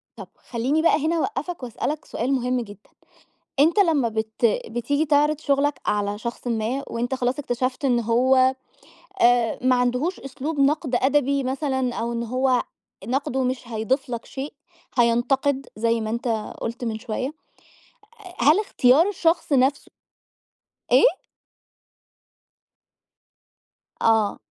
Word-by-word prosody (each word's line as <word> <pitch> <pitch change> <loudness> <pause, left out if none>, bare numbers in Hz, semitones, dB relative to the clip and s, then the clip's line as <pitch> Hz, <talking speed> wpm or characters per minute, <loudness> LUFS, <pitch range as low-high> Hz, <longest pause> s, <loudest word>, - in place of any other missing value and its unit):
طب - - -9 0.2
خلّيني 260 +6 0
بقى 315 -2 +3
هنا 330 +2 +1
أوقّفك 350 -3 -3
وأسألك 275 +5 -4
سؤال 255 +4 -2
مهم 250 -1 0
جدًا، 205 -3 -12 0.7
أنت 325 +8 +4
لمّا 315 - +3
بت 220 0 0
بتيجي 240 +6 -1
تعرض 295 0 +3
شُغلك 285 -1 +1
على 205 0 0
شخصٍ 235 +2 -6
ما، 235 +3 -1
وأنت 240 +3 -2
خلاص 255 +1 -1
اكتشفت 255 0 -2
إن 245 -3 +3
هو 255 +3 +3 0.7
آآ، 240 -1 +3
ما 255 0 +4
عندهوش 250 +8 0
أسلوب 280 +3 -4
نقْد 275 -1 +1
أدبي 280 +2 +2
مثلًا 265 -2 -1
أو 235 +1 -2
إن 235 0 -2
هو 255 +1 +1 0.4
نقْده 265 +2 -1
مش 250 -1 -3
هيضيف 240 +5 -1
لك 235 -1 -4
شيء 275 +2 -6 0.5
هينْتَقد 260 +4 +2
زي 230 +1 +1
ما 215 0 -3
أنت 235 +2 -3 0.3
قُلت 235 +2 -4
من 225 -2 -3
شوية 245 +5 -4 0.9
آآ، 360 - -11
هل 300 - +5
اختيار 300 -4 +3
الشخص 335 -5 0
نَفْسه 270 +1 +2 1.0
إيه؟ - - +7 2.9
آه. 220 -2 +2
255 Hz, 125 wpm, -23 LUFS, 235-285 Hz, 2.9 s, إيه